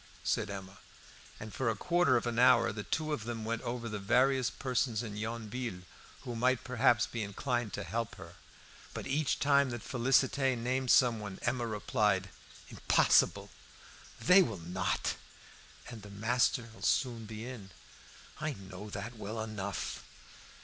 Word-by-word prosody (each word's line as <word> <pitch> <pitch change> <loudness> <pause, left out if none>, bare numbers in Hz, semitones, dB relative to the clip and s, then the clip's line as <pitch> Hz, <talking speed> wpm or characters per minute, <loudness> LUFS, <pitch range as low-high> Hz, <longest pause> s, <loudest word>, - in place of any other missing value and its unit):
said 110 -1 0
Emma. 95 -1 -8 0.6
And 110 0 -8
for 130 -3 0
a 110 - 0
quarter 175 - +3
of 120 - -2
an 120 -1 -1
hour 125 -2 +6
the 105 +1 -5
two 155 +7 -2
of 115 -7 -4
them 115 -2 -4
went 115 0 -2
over 120 0 -4
the 105 -2 -4
various 125 +5 +3
persons 125 -3 -1
in 105 -3 -6
Yonville 110 -2 -4 0.4
who 120 -3 -6
might 130 +2 +2
perhaps 120 -3 +3
be 120 - -5
inclined 115 +2 -2
to 105 - -3
help 115 +5 -3
her. 85 +1 -11 0.6
But - - -5
each 145 +1 0
time 140 -1 +4
that 120 -3 -5
Félicité 130 0 +2
named 125 +2 -1
someone 110 -7 +3
Emma 120 0 0
replied 105 -3 0 0.4
"Impossible! - - +3 0.7
they 180 +3 +7
will 115 - -1
not!" 90 +3 -2 0.7
"And 115 -3 -9
the 105 - -11
master'll 115 +2 0
soon 120 -4 0
be 110 +1 -7
in." 120 -6 -8 0.7
"I 155 -1 -2
know 95 0 -9
that 110 +4 -6
well 110 +2 -5
enough. 105 -3 -4
115 Hz, 150 wpm, -32 LUFS, 105-125 Hz, 0.7 s, they